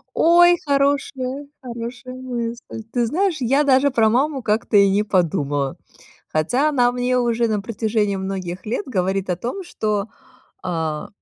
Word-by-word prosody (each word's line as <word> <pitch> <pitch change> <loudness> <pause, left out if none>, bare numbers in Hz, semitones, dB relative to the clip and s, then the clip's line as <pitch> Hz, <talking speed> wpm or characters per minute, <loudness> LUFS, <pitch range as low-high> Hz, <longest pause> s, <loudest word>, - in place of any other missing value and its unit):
Ой, 345 +1 +6
хорошая, 275 -1 0
хорошая 245 0 -7
мысль! 240 -3 -5
Ты 245 -2 +1
знаешь, 350 - 0
я 270 +4 +2
даже 275 0 +4
про 225 -3 +3
маму 270 +4 +1
как-то 215 -1 0
и 200 -1 +6
не 205 +2 +2
подумала. 145 -8 0 0.5
Хотя 245 - +1
она 245 -5 +3
мне 250 0 0
уже 235 -1 +1
на 215 -2 -1
протяжении 215 -1 -1
многих 190 -2 -5
лет 235 - -2
говорит 190 -4 -1
о 180 - +1
том, 250 - -5
что, 210 - -2 0.6
а: 160 -3 -3
235 Hz, 145 wpm, -21 LUFS, 200-265 Hz, 0.6 s, Ой